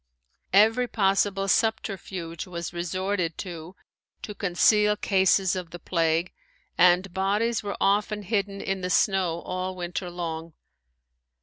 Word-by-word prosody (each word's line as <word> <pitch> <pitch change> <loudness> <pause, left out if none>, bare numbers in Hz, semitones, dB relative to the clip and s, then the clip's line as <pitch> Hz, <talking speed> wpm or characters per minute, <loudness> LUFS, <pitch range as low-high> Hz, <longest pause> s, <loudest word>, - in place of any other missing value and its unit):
Every 225 +5 +5
possible 195 -2 +1
subterfuge 190 -6 -1
was 170 -1 -6
resorted 180 0 -2
to 175 0 -7 0.5
to 210 - -5
conceal 210 +2 +3
cases 190 -2 +2
of 180 -2 -5
the 175 - -8
plague 165 0 0 0.4
and 180 +1 +4
bodies 205 +5 0
were 205 -1 -5
often 205 +1 +1
hidden 200 -1 -2
in 195 -1 -2
the 180 - -2
snow 180 -3 +1
all 185 0 -4
winter 180 0 -4
long. 165 -2 -5
190 Hz, 120 wpm, -26 LUFS, 175-200 Hz, 0.5 s, Every